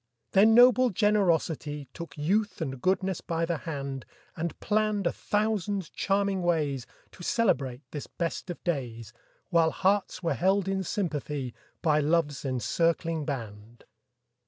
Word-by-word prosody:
Then 215 +3 +6
noble 250 +1 +7
generosity 170 - +1
Took 170 -1 -8
youth 200 +8 0
and 135 -6 -4
goodness 190 +1 0
by 165 0 -1
the 165 -1 -1
hand, 140 -3 -4 0.3
And 165 +1 -4
planned 210 -2 +1
a 170 - +3
thousand 205 -3 -1
charming 195 -1 0
ways 150 -7 0 0.2
To - - -14
celebrate 135 - +1
this 145 - -6
best 170 +2 -4
of 175 - -6
days, 120 - -3 0.4
While 165 -2 +4
hearts 195 +1 0
were 165 - +1
held 190 +1 +2
in 195 0 0
sympathy 150 - -3 0.3
By 155 -3 +4
love's 150 -2 +1
encircling 165 +5 0
band. 115 -4 -6
170 Hz, 135 wpm, -28 LUFS, 145-195 Hz, 0.4 s, noble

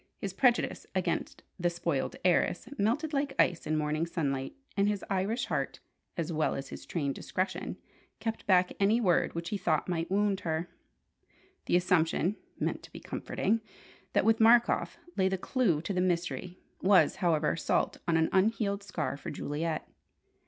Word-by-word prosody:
His 195 -2 -4
prejudice 240 +3 +2
against 185 -2 -1 0.2
the 175 0 +2
"spoiled 170 -5 -2
heiress" 175 +1 +2
melted 290 +10 +1
like 275 -1 0
ice 175 - +2
in 155 0 +1
morning 155 +2 0
sunlight, 140 -6 -2 0.2
and 200 0 +3
his 205 -2 -1
Irish 200 +6 0
heart 140 -4 -2 0.4
as 170 0 -2
well 155 0 +1
as 135 0 -5
his - - -9
trained 140 -5 -1
discretion 185 +6 -3 0.4
kept 225 -1 -4
back 185 -2 +4
any 205 +4 +4
word 180 -8 +2
which 170 0 -3
he 205 - -2
thought 160 -4 +1
might 170 -2 -1
wound 200 0 +2
her. 160 +1 -2 1.0
The - - +3
assumption 180 +1 +2 0.2
(meant - - -1
to - - -14
be - - -9
comforting) 225 +1 -1 0.5
that - - +3
with 225 0 +4
Markoff 230 +1 +4 0.2
lay 190 -1 +3
the 190 - 0
clue 185 - +1
to 200 - -2
the 180 - +1
mystery, 180 0 -1 0.2
was, 195 0 +5
however, 160 -4 +2
salt - - 0
on 165 -1 +3
an 160 0 +2
unhealed 200 0 +2
scar 200 -7 -3
for - - -7
Juliet. 155 +2 -3
180 Hz, 165 wpm, -30 LUFS, 165-205 Hz, 1.0 s, was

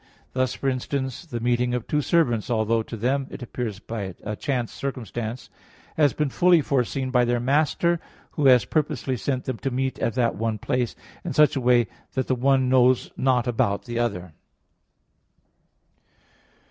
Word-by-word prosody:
Thus, 130 -1 0
for 135 - -3
instance, 130 +2 -2
the 120 -6 -4
meeting 120 +1 +1
of 120 - -3
two 150 - 0
servants, 125 -9 +1
although 115 -1 +1
to 115 +1 -7
them 130 +5 0
it - - -8
appears 115 -4 -4
a 105 -1 -5
chance 125 -1 -2
circumstance, 120 -3 -5 0.4
has 145 -3 +4
been 150 -3 -1
fully 175 +2 +5
foreseen 130 -1 -1
by 125 -1 +4
their 120 0 +1
master, 155 +6 +2 0.3
who 145 -3 +1
has 125 -2 +6
purposely 150 -4 -1
sent 130 +1 -2
them 130 -3 -3
to 135 - -2
meet 130 +1 -2
at 115 - -1
the 125 -2 +3
one 110 0 -2
place, 125 +2 -1 0.3
in 170 - -4
such 150 +2 +4
a 135 - -1
way 120 -1 +4 0.3
that 130 -1 0
the - - 0
one 130 +1 +2
knows 130 -1 +3
not 130 -2 +2
about 105 -5 0
the 120 -1 -3
other. 90 -8 -2
125 Hz, 165 wpm, -24 LUFS, 120-135 Hz, 0.4 s, has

